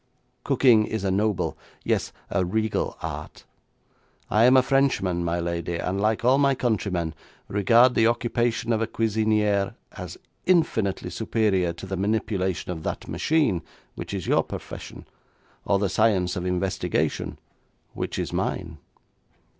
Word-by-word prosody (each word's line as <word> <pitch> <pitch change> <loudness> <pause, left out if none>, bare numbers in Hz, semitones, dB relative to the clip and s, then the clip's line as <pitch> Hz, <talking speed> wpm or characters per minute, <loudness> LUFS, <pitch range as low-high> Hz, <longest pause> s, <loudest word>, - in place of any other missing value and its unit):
Cooking 115 -5 +4
is 110 -3 -3
a 95 - +1
noble, 105 0 0 0.3
yes, - - 0 0.2
a 100 - +1
regal 110 +4 -1
art. - - -6 0.9
I 110 +2 +5
am 130 +1 +7
a 130 - +6
Frenchman, 125 -11 +1
my 85 +1 -1
lady, 85 0 -2
and, 95 +3 -2
like 110 +2 +1
all 130 +2 +5
my 140 -1 +3
countrymen, 95 -9 -1 0.3
regard 115 +5 +4
the 115 - +4
occupation 120 0 0
of 110 - 0
a 115 - 0
cuisinière 105 -3 +1 0.2
as - - -8 0.3
infinitely 110 - +1
superior 100 -4 +1
to 85 - -9
the 95 0 -4
manipulation 100 -3 -1
of 80 -3 -5
that - - -4
machine, 150 - +1 0.3
which - - -7
is - - -4
your - - +3
profession, - - -8 0.6
or 100 - +3
the 100 0 +1
science 95 -3 +2
of 90 0 -3
investigation, 90 +1 -1 0.6
which - - -4
is - - -3
mine.' - - -3
105 Hz, 140 wpm, -25 LUFS, 95-115 Hz, 0.9 s, am